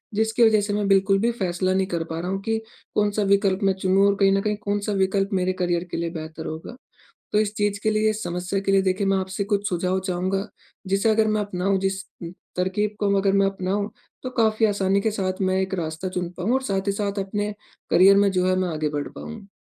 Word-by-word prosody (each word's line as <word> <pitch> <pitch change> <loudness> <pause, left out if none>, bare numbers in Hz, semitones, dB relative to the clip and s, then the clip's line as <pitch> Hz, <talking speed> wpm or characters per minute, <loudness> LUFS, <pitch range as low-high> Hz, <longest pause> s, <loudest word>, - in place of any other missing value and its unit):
जिसकी 220 +2 +2
वजह 220 -2 +5
से 205 0 -2
मैं 205 -1 0
बिल्कुल 195 0 +4
भी 235 +3 +2
फ़ैसला 185 -4 -1
नहीं 190 0 +1
कर 170 -3 -2
पा 160 0 -3
रहा 175 +2 -3
हूँ 195 - -1
कि 225 +2 -1 0.4
कौन-सा 210 0 +1
विकल्प 200 -1 +3
मैं 195 -1 +3
चुनूँ 190 +1 +4
और 200 - +3
कहीं 195 -1 +5
न 195 0 +2
कहीं 210 +1 0
कौन-सा 205 0 -2
विकल्प 195 0 +1
मेरे 185 -1 +1
करियर 175 -2 0
के - - -3
लिए 170 0 -2
बेहतर 160 -1 -7
होगा। 160 +9 -6 0.6
तो 210 - +3
इस 210 -1 0
चीज़ 205 -1 0
के 220 - +3
लिए, 215 0 +2
इस 215 0 -2
समस्या 180 +3 -2
के 195 - 0
लिए 195 0 +5
देखिए 190 +1 0
मैं 195 0 +3
आपसे 190 +1 -2
कुछ 205 0 -1
सुझाव 180 +1 0
चाहूँगा 185 +2 -1 0.4
जिसे 195 +3 +2
अगर 220 0 +3
मैं 215 0 +1
अपनाऊँ, 195 -1 0
जिस 195 0 -1 0.5
तरकीब 200 +3 0
को 200 -1 +2
अगर 195 0 +2
मैं 195 0 +4
अपनाऊँ। 195 +2 -2 0.3
तो 255 - -3
काफ़ी 220 0 +3
आसानी 200 -1 +1
के 220 - 0
साथ 190 -2 -2
मैं 185 0 +1
एक 190 0 -3
रास्ता 160 +4 -4
चुन 180 -1 -3
पाऊँ 190 +7 0
और 265 - +2
साथ 195 -4 -2
ही - - +3
साथ 200 0 -2
अपने 205 +2 -3 0.4
करियर 195 +2 +6
में 200 0 +4
जो 185 -1 +1
है 185 - +3
मैं 185 -1 0
आगे 155 -2 -1
बढ़ 145 -1 -3
पाऊँ। 220 -3 -9
195 Hz, 235 wpm, -24 LUFS, 185-205 Hz, 0.6 s, करियर